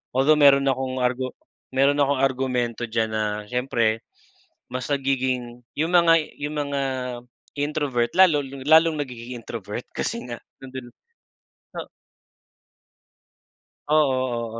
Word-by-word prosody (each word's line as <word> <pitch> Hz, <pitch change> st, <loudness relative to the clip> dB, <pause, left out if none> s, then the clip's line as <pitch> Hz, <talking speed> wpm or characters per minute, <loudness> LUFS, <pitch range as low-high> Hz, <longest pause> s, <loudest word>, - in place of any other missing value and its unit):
Although, 150 Hz, +4 st, +4 dB
meron 140 Hz, -1 st, +6 dB
akong 130 Hz, -1 st, -1 dB
argu 125 Hz, +1 st, 0 dB, 0.5 s
meron 140 Hz, +2 st, +3 dB
akong 140 Hz, -1 st, +2 dB
argumento 125 Hz, -3 st, 0 dB
diyan 110 Hz, -1 st, 0 dB
na, 110 Hz, 0 st, 0 dB, 0.3 s
siyempre 120 Hz, -3 st, +1 dB, 0.7 s
mas 130 Hz, 0 st, -4 dB
nagiging 130 Hz, -3 st, -1 dB, 0.2 s
'yong 160 Hz, +3 st, +1 dB
mga 170 Hz, -1 st, +6 dB, 0.3 s
'yong 145 Hz, +1 st, -3 dB
mga 140 Hz, -1 st, -2 dB, 0.8 s
introvert, 145 Hz, -5 st, 0 dB
lalo 175 Hz, -6 st, +6 dB
lalong 150 Hz, +4 st, +3 dB
nagiging 125 Hz, -2 st, -7 dB
introvert, 115 Hz, 0 st, -6 dB
kasi 235 Hz, 0 st, -3 dB
nga, 120 Hz, -1 st, -5 dB, 0.2 s
'yon 135 Hz, -, -9 dB
din. 130 Hz, -2 st, -6 dB, 0.9 s
O -, -, -5 dB, 2.0 s
Oo, 130 Hz, -6 st, +1 dB
130 Hz, 110 wpm, -24 LUFS, 120-145 Hz, 2.0 s, meron